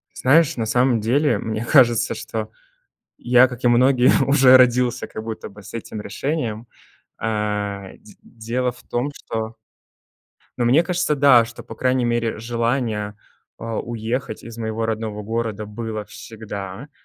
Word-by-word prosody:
Знаешь, 145 +2 +3
на 115 - -1
самом 125 +1 +2
деле, 140 +8 +2
мне 110 0 -3
кажется, 120 -5 +4
что 110 -1 -5 0.7
я, 125 +1 +5
как 125 -1 -10
и 120 - +4
многие, 125 +1 +4 0.2
уже 135 -2 +7
родился 125 -1 +2
как 110 - -7
будто 110 -1 -6
бы 105 +1 -14
с - - -12
этим 110 -2 -6
решением. 115 -1 -3 0.5
Э, 105 -3 -3
дь - - -17
дело 120 +2 -3
в 120 - -17
том, 125 +4 -2
что 110 0 -5 1.0
Ну, 120 - +2
мне 140 +8 +4
кажется, 175 -4 0
да, 135 -5 +6
что 115 - -11
по - - -10
крайней 130 0 0
мере 120 -2 0
желание, 115 -2 -2 0.4
э, - - -9
уехать 115 +1 -4
из 115 0 -10
моего 110 0 -2
родного 110 -1 -3
города 110 -1 -3
было 110 0 -5
всегда. 105 +2 -8
115 Hz, 150 wpm, -21 LUFS, 110-125 Hz, 1.0 s, уже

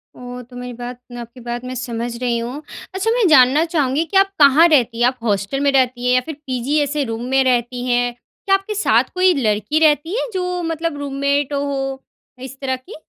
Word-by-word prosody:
ओह! 250 0 -8
तो 245 +1 -15
मेरी 250 0 -7
बात 245 +1 -7
मैं 245 - -8
आपकी 235 +2 -12
बात 240 0 -5
मैं 255 0 -5
समझ 235 -1 -4
रही 240 -2 0
हूँ। 245 +5 -5 0.3
अच्छा 405 +4 0
मैं 465 -4 +2
जानना 280 0 +5
चाहूँगी 300 -3 0
कि 355 +4 0
आप 390 0 +4
कहाँ 290 +3 +7
रहती 250 -7 +2
हैं? 240 - +5
आप 255 +1 -2
हॉस्टल 205 +3 -1
में 280 0 +2
रहती 255 -2 +1
हैं? 250 - +3
या 255 - +3
फिर 315 - -6
पीजी 260 +3 -1
ऐसे 290 +1 -1
रूम 230 -2 -4
में 265 0 +3
रहती 245 -1 0
हैं? 245 0 +1 0.3
क्या 390 -1 +4
आपके 390 +2 -4
साथ 420 - +3
कोई 370 0 +4
लड़की 215 - 0
रहती 310 +5 +2
है - - -3
जो 360 -1 -2
मतलब 330 -1 -3
रूममेट 280 0 -1
हो, 270 -1 -3 0.4
इस 265 +1 -9
तरह 260 -1 -1
की? 260 +11 -12
265 Hz, 215 wpm, -19 LUFS, 245-305 Hz, 0.4 s, कहाँ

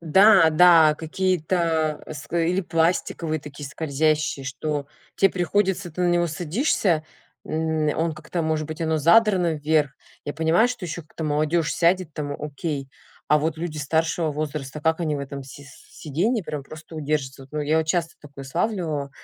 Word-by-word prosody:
да, 190 +1 +6
да 160 -1 +6
какие-то, 165 -2 0
а, 155 - -7
с 150 - -9
или 170 +2 +2
пластиковые 165 -2 0
такие 145 0 -9
скользящие, 155 -1 0
что 145 +1 -3 0.3
те 195 - +5
приходится 185 0 0
ты 165 - -7
на 180 - +3
него 175 0 +2
садишься, 170 - 0 0.4
м, 160 -1 -1
он 165 0 0
как-то 160 +3 -4
может 155 -1 -1
быть 155 +1 -7
оно 160 -1 +1
задрано 180 0 +4
вверх. 150 -1 +1 0.3
Я 145 - -3
понимаю, 160 +9 +3
что 245 -6 -5
еще 170 +1 -5
как-то 160 +1 -8
молодежь 155 +2 +1
сядет 175 -1 +2
там 145 -1 -4
окей, 145 -1 -4 0.4
а 150 - +5
вот 155 +1 -1
люди 160 -1 -5
старшего 160 +2 0
возраста, 150 -1 -4
как 160 +2 +1
они 155 -3 0
в - - -4
этом 140 0 -6
си 135 +2 -12
с 145 - -17
сиденье 190 - 0
прямо 150 -3 -5
просто 155 +3 -12
удержатся 145 -3 -2
вот. 135 - -15
Ну 150 - -2
я 150 +2 +2
вот 160 - 0
часто 165 0 0
такое 140 -2 -11
славливала, 155 -2 -2
160 Hz, 170 wpm, -24 LUFS, 150-170 Hz, 0.4 s, да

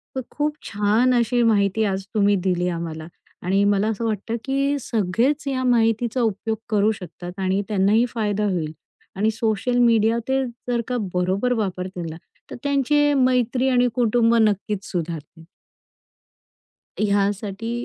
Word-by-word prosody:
तर 260 - -1
खूप 300 0 -1
छान 215 +5 +2
अशी 240 +1 +2
माहिती 210 -1 +2
आज 190 -1 -2
तुम्ही 205 -1 +4
दिली 180 -2 0
आम्हाला. 165 -2 -5 0.3
आणि 195 +3 +1
मला 205 +1 +2
असं 225 +1 -2
वाटतं, 225 +1 -2
की 275 +1 0
सगळेच 235 +6 0
या 260 -1 -1
माहितीचा 235 0 +2
उपयोग 220 0 -1
करू 210 0 +3
शकतात 180 -1 -8
आणि 190 +1 +1
त्यांनाही 210 +3 +3
फायदा 210 -3 -1
होईल. 160 -4 -2 0.5
आणि 215 +3 +2
सोशल 225 +2 -1
मीडिया 230 -1 +4
ते 265 0 +1 0.3
जर 240 -1 +1
का 250 -1 -1 0.2
बरोबर 190 +7 +1
वापरतील 185 -5 -3
ना, 160 - -7 0.4
तर - - -5
त्यांचे 290 +1 +2
मैत्री 255 -1 +2
आणि 250 -1 +3
कुटुंब 235 -1 +3
नक्कीच 210 -2 +1
सुधारतील. 165 -2 -5 1.6
ह्यासाठी 205 +1 0
215 Hz, 140 wpm, -22 LUFS, 195-245 Hz, 1.6 s, तुम्ही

